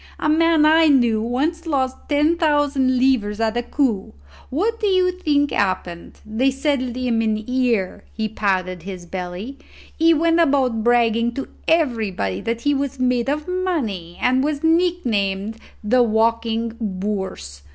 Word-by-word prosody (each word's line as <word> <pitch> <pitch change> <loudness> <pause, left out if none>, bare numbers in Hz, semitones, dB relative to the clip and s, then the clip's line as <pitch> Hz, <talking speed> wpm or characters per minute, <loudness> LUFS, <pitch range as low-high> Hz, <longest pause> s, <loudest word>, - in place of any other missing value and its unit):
"A - - -1
man 320 0 +4
I 320 +1 +5
knew 240 -6 +3
once 300 +9 -2
lost 260 -4 0
ten 300 +3 +3
thousand 290 -5 +1
livres 240 -5 +1
at 225 0 0
a 240 - +1
coup. 235 - -1 0.3
What 430 - -1
do 425 - 0
you 370 -2 +3
think 295 -6 0
happened? 180 -3 -3
They 225 +5 +1
settled 270 -3 -1
in 245 -3 0
him 220 -1 +1
here;" 230 -3 -1
he 220 0 -3
patted 185 -4 -1
his 185 0 -8
belly: 185 +9 -6 0.4
"he 330 +1 +4
went 330 +2 +2
about 265 -8 +2
bragging 235 0 +2
to 275 - -5 0.2
everybody 220 - 0
that 230 0 -3
he 290 +2 +1
was 275 -1 -3
made 250 0 +1
of 300 +2 -2
money, 275 - -3
and 255 +1 +2
was 295 0 -2
nicknamed 230 - 0 0.3
the 245 +4 +3
walking 230 0 +1
bourse. 190 - -4
250 Hz, 150 wpm, -21 LUFS, 215-295 Hz, 0.4 s, I